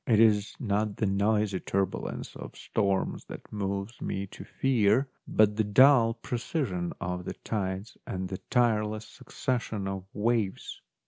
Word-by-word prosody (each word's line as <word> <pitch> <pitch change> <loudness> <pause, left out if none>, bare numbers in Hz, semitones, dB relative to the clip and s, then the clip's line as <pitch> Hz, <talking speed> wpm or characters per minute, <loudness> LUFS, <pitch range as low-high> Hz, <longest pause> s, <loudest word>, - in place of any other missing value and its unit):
It 110 -3 +4
is 105 -2 +4
not 105 -4 0
the - - +1
noisy 100 0 +2
turbulence 95 0 -2
of - - -8
storms 100 -3 -1
that - - -10
moves 100 +2 -3
me 95 +1 -2
to - - -8
fear, 125 0 +2 0.2
but 105 -1 +4
the 110 - +3
dull 115 +2 +6
precision 115 - -2
of 90 0 -3
the - - -4
tides 100 0 -3
and 95 0 -3
the 95 0 -5
tireless 110 -3 +2
succession 120 -6 -3
of 95 -1 -4
waves. 110 -2 -1
105 Hz, 140 wpm, -29 LUFS, 100-115 Hz, 0.2 s, dull